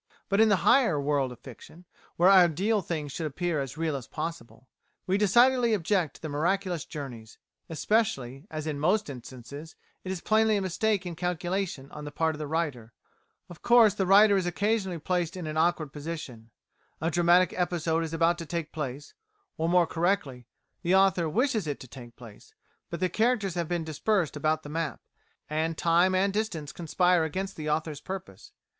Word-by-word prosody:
But 200 +2 +3
in 220 - +5
the 205 - +5
higher 220 - +4
world 140 -2 0
of 125 - -10
fiction, 155 +7 -13 0.3
where 175 - +4
ideal 190 +3 +4
things 155 -5 -4
should 160 +2 -3
appear 160 +1 -2
as 135 +2 -6
real 160 -2 -1
as 130 -4 -6
possible, 165 -6 -7 0.4
we 185 - +1
decidedly 235 +3 +4
object 180 -4 -1
to - - -3
miraculous 170 +2 -1
journeys, 120 -7 -8 0.3
especially, 155 - -1
as 155 -1 -5
in 150 -2 -3
most 180 +2 +1
instances, 130 +5 -10 0.3
it 185 - -4
is 190 - -3
plainly 220 +2 +2
a - - -1
mistake 195 +1 0
in 175 -2 -5
calculation 175 -4 -3
on 150 - -8
the 145 - -7
part 160 +2 0
of 150 - -9
the 150 - -4
writer. 140 -8 -3 0.5
Of 175 - -13
course 235 -4 +6
the 195 -2 -1
writer 200 +2 +6
is 185 -2 -1
occasionally 195 0 -1
placed 175 +2 -2
in 180 - -5
an 155 0 -4
awkward 160 -3 +1
position. 145 -7 -7 0.5
A 165 +2 -1
dramatic 175 +1 +4
episode 170 -2 0
is 160 - -5
about 165 +1 +1
to 165 - -5
take 165 -2 -4
place, 145 -2 -6 0.4
or, 165 +1 -1
more 175 0 +4
correctly, 160 -9 -1 0.3
the 180 +1 +2
author 190 -4 +3
wishes 225 - 0
it 145 - -3
to 130 - -11
take 120 -2 -12
place, 115 -4 -15 0.3
but 170 - -6
the 185 - +3
characters 220 0 0
have 170 -2 -2
been 175 -1 -2
dispersed 160 +3 -1
about 155 +1 0
the 145 - -9
map, 160 0 -3 0.5
and 160 +1 -2
time 175 +3 +3
and 195 +1 +2
distance 190 -9 -3
conspire 175 +1 +1
against 190 +5 -3
the 155 -1 -4
author's 150 -1 -2
purpose. 180 - -8
165 Hz, 180 wpm, -28 LUFS, 150-190 Hz, 0.5 s, course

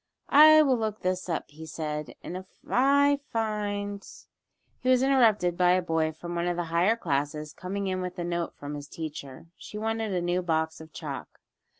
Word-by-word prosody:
"I 310 +2 +9
will 260 -4 +2
look 215 -1 -3
this 185 0 -2
up," 165 - -3
he 160 +2 -10
said, 150 -1 -5
"and 180 - -6
if 185 0 -7 0.2
find 225 -7 +1 0.4
" - - -46
He 255 - -1
was 255 0 +4
interrupted 225 -10 +3
by 180 0 +4
a 185 - +2
boy 160 -2 0
from 170 +2 -8
one 170 0 -1
of 175 -1 -1
the 175 - 0
higher 180 +7 +4
classes 150 -5 -2
coming 195 +2 -4
in 185 -1 -1
with 180 0 -5
a 175 - -3
note 170 0 -3
from 145 0 -7
his 145 -1 -7
teacher. 145 -3 -7
She 210 - -9
wanted 225 0 -2
a 185 - 0
new 175 +1 0
box 160 -2 -1
of 160 0 -12
chalk. - - -7
180 Hz, 195 wpm, -27 LUFS, 160-220 Hz, 0.4 s, I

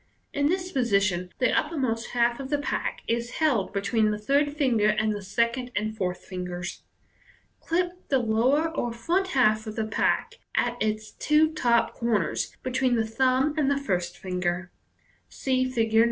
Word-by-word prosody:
In 285 0 +2
this 365 +1 -1
position, 200 - +1
the 255 -2 +2
uppermost 260 -7 0
half 240 0 +2
of 270 -1 -6
the 290 - +1
pack 290 - -3
is 235 +1 -1
held 275 -11 +1
be 200 - -1
tween 215 +2 +2
the 210 - -1
third 280 +7 +1
finger 240 -8 +3
and 215 0 +2
the 205 - -5
second 235 +6 -1
and 215 +1 -1
fourth 180 -4 -3
fin 185 -1 -5
gers. 175 0 -5 0.8
Clip 350 +1 0 0.2
the 275 - +4
lower 250 +7 +2
or 240 -7 -2
front 340 +12 0
half 215 -3 +3
of 215 - -5
the 220 -1 -1
pack 220 - 0 0.2
at 240 0 +1
its 215 0 -1
two 310 +1 +3
top 235 -6 +2
corners 225 -6 -1
between 255 -1 +1
the 225 -1 +1
thumb 260 +5 +2
and 295 -3 +2
the 280 - +2
first 180 -10 -2
finger. 180 -1 -2 0.6
(See 255 -1 0
Fig. 230 -4 0
9.) 220 - +6
235 Hz, 175 wpm, -26 LUFS, 210-270 Hz, 0.8 s, 9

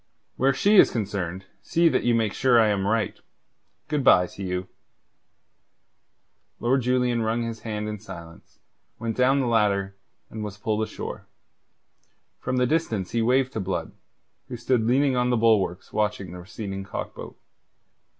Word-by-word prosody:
"Where 135 +2 +3
she 205 +10 +3
is - - +8
concerned 95 -4 -3 0.2
see 170 0 +2
that - - +2
you 120 -1 +2
make 110 -3 0
sure 130 -2 +3
that 115 - +7
I - - +3
am 100 -1 0
right. 110 -2 0 0.7
Good 150 -3 -1
bye 90 -7 +6
to 100 - -11
you." 90 -1 -3 1.9
Lord 130 +3 +2
Julian 125 -1 +1
wrung 115 +1 0
his 115 -1 -5
hand 105 -2 -4
in 105 -1 -5
silence, 85 -5 -12 0.4
went 115 -1 -3
down 135 +2 +3
the - - 0
ladder, 100 -4 +1 0.4
and 110 -1 -5
was 105 -1 -6
pulled 105 +1 -1
ashore. 110 0 -6 1.1
From 130 - -2
the 125 - +3
distance 120 - -1
he 115 - 0
waved 130 +3 +2
to - - -2
Blood, 95 -1 -3 0.6
who 125 -2 -6
stood 120 -1 +1
leaning 135 +2 +3
on 125 0 +1
the 120 - +2
bulwarks 105 -6 +1
watching 105 -4 -1
the 90 - -8
receding 95 +1 -6
cock 95 - -6
boat. - - -10
110 Hz, 165 wpm, -25 LUFS, 100-125 Hz, 1.9 s, is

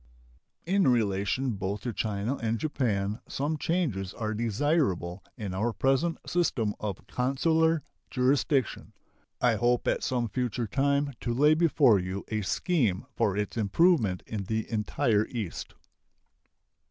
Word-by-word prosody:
In 190 0 +2
relation 115 +2 +1
both 100 0 -3
to 120 - -4
China 110 +5 -2
and 115 0 -1
Japan 110 -7 -1
some 145 +3 -2
changes 145 - -1
are 110 -1 -2
desirable 110 - 0
in 100 -5 -4
our 110 +6 0
present 135 +8 +1
system 125 -12 0
of 100 -4 -5
consular 160 +5 +1 0.3
jurisdiction. 130 0 0 0.5
I 120 -3 +3
hope 120 +3 +1
at - - +1
some 120 -2 0
future 120 0 -2
time 140 +4 +1
to 120 -1 -2
lay 150 +4 +5
before 150 - +4
you 95 +2 -4
a 110 -1 -1
scheme 115 - 0
for 100 -1 +1
its 105 +2 -2
improvement 110 - +2
in 105 -3 -4
the 110 +2 -2
entire 105 0 +1
East. 110 -8 -5
120 Hz, 130 wpm, -28 LUFS, 105-140 Hz, 0.5 s, lay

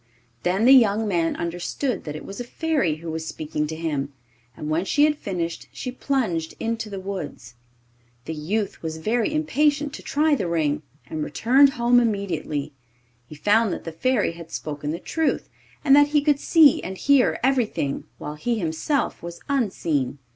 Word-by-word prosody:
Then 190 +5 +1
the 260 - +7
young 220 -4 +5
man 170 -4 +1
understood 175 +10 -3
that 150 -1 -5
it 155 - -7
was 200 - -8
a - - -2
Fairy 275 - 0
who 160 +1 -7
was 160 0 -4
speaking 150 -1 -3
to 160 - -5
him, 150 -4 -2 0.5
and 150 - -5
when 155 +3 +1
she 290 +9 +2
had 300 0 +4
finished 175 - -4
she 250 - -5
plunged 225 -12 -1
into 230 -1 -2
the 195 -2 -5
woods. 180 -10 -6 0.7
The 160 - -4
youth 190 +7 -2
was 160 -1 -4
very 225 - 0
impatient 295 -1 +1
to - - -7
try 305 +1 +1
the 205 -10 0
ring, 155 -3 0 0.2
and 155 -1 -4
returned 265 - +4
home 240 0 +4
immediately. 170 -10 -2 0.5
He 155 - -10
found 210 +7 +3
that - - -6
the 165 - -5
Fairy 230 +6 +1
had 165 -1 -11
spoken 145 -1 -5
the 160 - -2
truth, 320 - -1 0.4
and 275 -1 +7
that 290 0 +6
he 295 0 +2
could 295 -2 +3
see 310 -4 +5
and 190 0 -6
hear 280 +1 +3
everything, 245 - 0
while 150 - -6
he 230 +10 -1
himself 190 - -1
was 170 0 -8
unseen. 165 - 0
195 Hz, 175 wpm, -24 LUFS, 160-260 Hz, 0.7 s, the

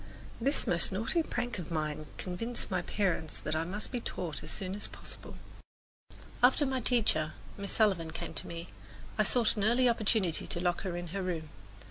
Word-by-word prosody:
This 275 +5 +3
most 170 -1 +4
naughty 225 - +2
prank 245 -8 -2
of 170 - -6
mine 155 -1 -2
convinced 230 +6 -3
my 185 -1 +1
parents 180 -5 -1
that 155 - -2
I 160 - +1
must 195 +5 -3
be 250 - -1
taught 170 -8 -3
as - - -6
soon 190 -1 -2
as 205 - -1
possible. - - -6 1.1
After 260 +4 +6
my 265 -1 0
teacher, 215 -11 +2 0.2
Miss 200 -1 -4
Sullivan, 190 -7 +3
came - - -5
to - - -5
me, 170 +1 -6 0.5
I - - +7
sought 235 -3 +4
an 205 - +1
early 240 +4 +5
opportunity 215 -7 +2
to - - -1
lock 175 0 +1
her 180 -2 -3
in 175 -1 -5
her 195 +4 -2
room. 165 -4 -2
190 Hz, 185 wpm, -32 LUFS, 170-230 Hz, 1.1 s, I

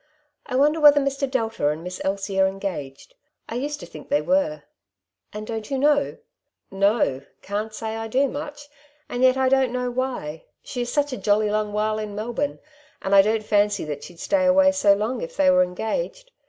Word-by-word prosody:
" 295 - -49
I 255 - -3
wonder 295 +4 +3
whether 295 -1 +8
Mr. 275 0 -1
Delta 225 - -1
and 155 +2 -4
Miss 180 +1 -6
Elsie 195 0 -2
are 190 - +5
engaged. 190 - -6 0.3
I - - -7
used 290 +5 -3
to - - -7
think - - -12
they 290 - +2
were." 290 +2 +1 0.3
" - - -57
And 210 0 -6
don't 220 -1 -5
you 275 - -1
know? 290 +1 +2 0.3
" - - -54
'^ - - -9
No; 195 - +2 0.2
can't 210 +2 -3
say 220 0 -5
I 225 0 -4
do, 265 +5 +2
much; 290 +1 -7 0.4
and 245 - -4
yet 260 0 +5
I 265 0 +2
don't 265 -1 +3
know 250 0 -2
why. 245 -12 -4 0.2
She 250 - -5
is 240 0 -3
such 290 -1 0
a - - -3
jolly 210 0 +2
long 210 0 -1
while 215 +1 0
in 210 -1 -5
Melbourne, 240 +7 -2 0.5
and 195 - -1
I 195 - +9
don't 215 +2 0
fancy 205 -4 +2
that 145 -1 -5
she'd 175 -2 -12
stay 290 -2 +1
away 285 +1 +5
so 210 -9 +4
long 225 +4 -2
if 165 - -7
they 185 -1 +5
were 180 0 +5
engaged. 360 - -3
225 Hz, 215 wpm, -23 LUFS, 200-275 Hz, 0.5 s, I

